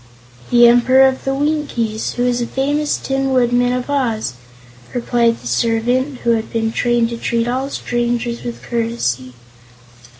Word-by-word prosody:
"The 240 0 +6
Emperor 255 +3 +5
of 265 0 -3
the 270 0 0
Winkies, 275 -7 -1
who 245 - -1
is 245 -1 +1
the 240 - -2
famous 290 +4 0
Tin 270 0 -2
Woodman 245 -1 +2
of 250 0 -2
Oz," 235 - -1 0.6
replied 235 -1 +1
the - - -17
servant, 240 - 0
who 235 - +1
had 225 -1 -1
been 225 -1 -1
trained 240 0 +1
to 235 - -4
treat 230 0 -1
all 260 +3 -2
strangers 240 -2 -2
with 240 - -7
courtesy. 225 - -2
240 Hz, 155 wpm, -18 LUFS, 230-260 Hz, 0.6 s, The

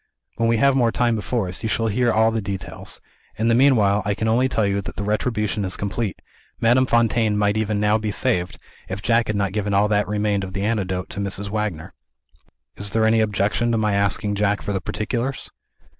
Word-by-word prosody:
When 115 0 +1
we 115 - +3
have 140 +3 +4
more 120 -3 +3
time 120 -1 +1
before 110 -1 -2
us, 90 - -3
you 110 - -2
shall 115 +1 0
hear 120 +3 +1 0.2
the 110 -1 -1
details. 95 -1 -5 0.4
In 115 +2 0
the - - +4
meanwhile, 115 -6 +4
I 105 0 -1
can 110 +2 -2
only 125 +4 +2
tell 110 -4 +1
you 100 0 0
that - - -8
the 105 - -4
retribution 105 0 -1
is 95 -1 -1
complete. 105 0 -3 0.4
Madame 125 +3 +3
Fontaine 115 -2 +2
might 105 0 +2
even 110 -1 0
now 105 +1 +2
be 110 0 -3
saved, 90 -3 0 0.3
if 95 +1 -5
Jack 115 0 +2
had 105 - -1
not 100 -2 -1
given 100 -1 -1
all 100 +1 +4
that 105 -1 +1
remained 105 -1 0
of 95 0 -6
the 100 +1 -2
antidote 95 -4 -2
to - - -5
Mrs. 100 0 -3
Wagner. 100 -5 -3 0.8
"Is 100 0 -3
there 110 +2 +1
any 110 0 +3
objection 105 +2 +1
to - - +2
my 105 -2 +1
asking 100 +1 0
Jack 105 0 0
for 100 - -2
the 95 - -2
particulars?" 120 +7 -3
105 Hz, 215 wpm, -22 LUFS, 100-115 Hz, 0.8 s, have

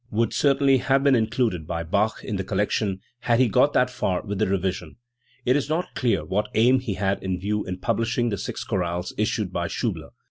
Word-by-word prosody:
I2a) 105 - -6
would 115 0 +2
certainly 140 -1 +3
have 135 +2 +2
been 140 -1 +5
included 110 -8 0
by 85 0 -3
Bach 100 +6 0
in 105 - -3
the 95 - -2
col - - -3
lection 105 -2 0 0.2
had 120 -1 +1
he 130 - +5
got 125 +7 +3
that 125 0 +3
far 90 -6 -1
with 100 -2 -4
the 110 - +2
revision. 95 -1 -2 0.5
It 125 - +3
is 145 -1 0
not 165 +3 -1
clear 115 - 0
what 105 +6 -1
aim 125 +4 +5
he 120 -6 -4
had 95 +1 -1
in 95 -1 -2
view 105 +2 -1
in 90 0 -4
publishing 115 +5 0
the 100 - -2
six - - -4
chorales 90 -2 -2
issued - - -1
by - - -1
Schiibler. - - -3
110 Hz, 220 wpm, -24 LUFS, 95-125 Hz, 0.5 s, been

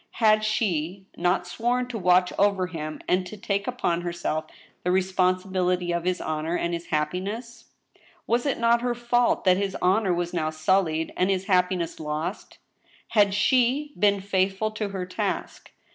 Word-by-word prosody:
Had 215 -2 +3
she 190 -4 -1
not 180 +1 +1
sworn 240 +7 -1
to 240 - -4
watch 180 0 +3
over 200 -2 +3
him, 155 -4 -6
and 185 +1 +2
to 215 - -9
take 200 0 -2
upon 175 -9 -1
herself 170 -2 -2 0.4
the 180 - 0
responsibility 185 -1 +1
of 170 0 -2
his 185 0 0
honor 155 +2 -2
and 170 0 -2
his 170 0 -4
happiness? 200 +10 -3 0.6
Was 240 +4 +1
it 275 - 0
not 235 0 +3
her 245 0 -1
fault 240 0 +1
that 185 -1 +4
his 195 -1 -2
honor 190 +2 +2
was 175 0 -1
now 160 -3 0
sullied, 160 0 0
and 185 +1 +1
his 190 -1 0
hap 180 -3 +3
piness 175 -3 -3
lost? 155 +5 -4 0.5
Had 210 -3 +5
jA^ 250 +8 +2
been 200 -1 +3
faithful 195 +2 0
to 215 -1 -3
her 190 -2 -4
task? 180 - -4
185 Hz, 165 wpm, -25 LUFS, 175-215 Hz, 0.6 s, Had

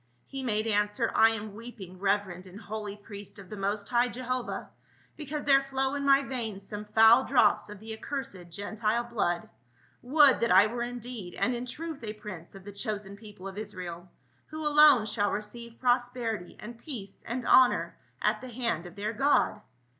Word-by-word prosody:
He 270 - -6
made 215 -4 0
answer, 210 +1 +1
" - - -8
I 225 - +7
am 215 -2 -4
weeping, 205 -5 -10
reverend 195 -2 -1
and 185 +3 -11
holy 210 -2 -6
priest 205 -1 -11
of 200 0 -12
the - - -4
most 200 +1 -2
high 240 +2 +3
Jehovah, 255 0 -4 0.4
because 300 -1 -5
there 275 -1 +5
flow 270 0 -1
in 285 0 -2
my 275 0 +5
veins 225 -7 -5
some 210 0 -6
foul 225 +4 +6
drops 235 -7 +3
of 210 -1 -9
the 220 +1 -7
accursed 220 -9 -6
Gentile 215 +5 -1
blood; 205 -8 -1 0.5
would 280 +1 +5
that 235 - +1
I 190 +3 +8
were 235 +2 -3
indeed 240 -6 -6
and 250 - +1
in 245 +1 -4
truth 310 +1 -6
a 210 -1 -4
prince 210 -6 -9
of 195 - -11
the 205 - -8
chosen 200 -1 -5
people 205 -2 -11
of 195 +1 -7
Israel, 185 -4 -7 0.4
who 310 0 -6
alone 295 -6 +7
shall 205 -1 0
receive 235 +3 -6
prosperity 245 -5 -1
and 235 +2 -9
peace 230 -9 -8
and 240 +1 -3
honor 255 -1 +5 0.3
at - - +2
the 255 - -8
hand 230 -8 -2
of 175 - -13
their 210 +2 -3
God." 250 -3 +2
220 Hz, 185 wpm, -29 LUFS, 205-250 Hz, 0.5 s, I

